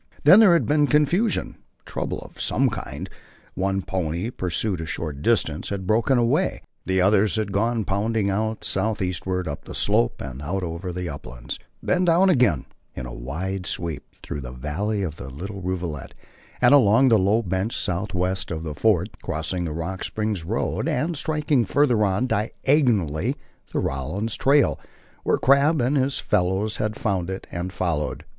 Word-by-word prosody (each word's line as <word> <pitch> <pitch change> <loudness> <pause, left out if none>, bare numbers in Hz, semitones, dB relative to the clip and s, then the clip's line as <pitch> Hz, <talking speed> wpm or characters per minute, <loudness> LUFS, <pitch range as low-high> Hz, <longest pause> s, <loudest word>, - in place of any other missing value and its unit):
Then 180 +8 +9
there 205 -6 +7
had 165 -8 +3
been 150 +2 +3
confusion, 175 +10 +1 0.3
trouble - - -3
of - - -10
some - - +2
kind: - - -6 0.5
One 95 0 -1
pony, 90 +3 -2
pursued 90 -2 -1
a 80 - -5
short 75 -4 -4
distance, 80 -7 +1
had 100 -2 -4
broken 115 +6 +3
away; 120 -1 +1 0.2
the 95 0 +2
others 100 +3 +3
had 110 -2 -1
gone 110 +2 0
pounding 105 +2 0
out 110 +3 -1
southeastward 95 -4 -1
up 70 - -5
the - - -8
slope - - +1
and 65 0 -7
out 95 +6 -2
over 85 +2 -4
the 90 0 -4
uplands, 65 -5 -7 0.2
then 180 0 +2
down 180 +3 +5
again, 120 - +3 0.3
in 65 - -5 0.2
wide 90 +8 -3
sweep, 85 -4 -3 0.2
through 70 - -5
the 60 - -7
valley 90 - -2
of 80 -4 -4
the - - -7
little 95 +9 -7
rivulet 90 -6 -4 0.5
and 125 +2 +6
along 130 -1 +6
the 110 -3 +5
low 105 +5 +2
bench 95 +4 -2
southwest 95 -1 -1
of 80 -1 -4
the 75 -2 -4
fort, 100 +3 +2
crossing 90 +1 -3
the 80 - -3
Rock 85 +5 -4
Springs 105 -5 -2
road - - -1
and 160 +7 0
striking, 150 -3 +1
further 120 -1 +2
on, 100 +4 +1
diagonally, 115 - +1 0.4
the - - -3
Rawlins 90 - -2
trail, 140 +1 +3 0.4
where - - +2
Crabb 140 +4 +4
and 130 +4 +1
his 135 0 +1
fellows 100 +2 0
had 105 0 -1
found 95 -6 -1
it 95 0 -5
and 85 +2 -4
followed. 80 -6 -2
95 Hz, 165 wpm, -24 LUFS, 85-115 Hz, 0.5 s, Then